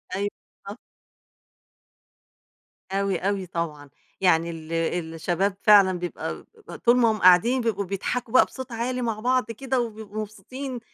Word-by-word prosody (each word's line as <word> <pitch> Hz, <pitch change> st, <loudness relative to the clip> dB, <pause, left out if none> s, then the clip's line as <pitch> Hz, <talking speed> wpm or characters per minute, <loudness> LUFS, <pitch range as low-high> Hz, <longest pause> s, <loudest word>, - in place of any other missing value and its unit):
أيوه، 200 Hz, +1 st, -1 dB, 0.4 s
آه. -, -, -6 dB, 2.2 s
أوي، 195 Hz, -1 st, 0 dB
أوي 195 Hz, +1 st, -1 dB
طبعًا، 155 Hz, -4 st, -5 dB, 0.3 s
يعني 170 Hz, -3 st, +3 dB
ال 165 Hz, -1 st, -7 dB, 0.4 s
الشباب 180 Hz, +4 st, -1 dB
فعلًا 195 Hz, -4 st, +6 dB
بيبقى 175 Hz, 0 st, -5 dB, 0.2 s
ب -, -, -8 dB
طول 240 Hz, +1 st, +3 dB
ما 235 Hz, -2 st, +4 dB
هُم 215 Hz, -, -2 dB
قاعدين 205 Hz, +9 st, +5 dB
بيبقوا 210 Hz, -4 st, -1 dB
بيضحكوا 210 Hz, +5 st, -3 dB
بقى 255 Hz, -, +7 dB
بصوت 260 Hz, -1 st, -9 dB
عالي 245 Hz, +2 st, -2 dB
مع 225 Hz, -3 st, -2 dB
بعض 250 Hz, 0 st, +1 dB
كده 260 Hz, +3 st, -2 dB
وبيبقوا 215 Hz, -2 st, -4 dB
مبسوطين، 245 Hz, +5 st, -7 dB
205 Hz, 135 wpm, -25 LUFS, 185-240 Hz, 2.2 s, بقى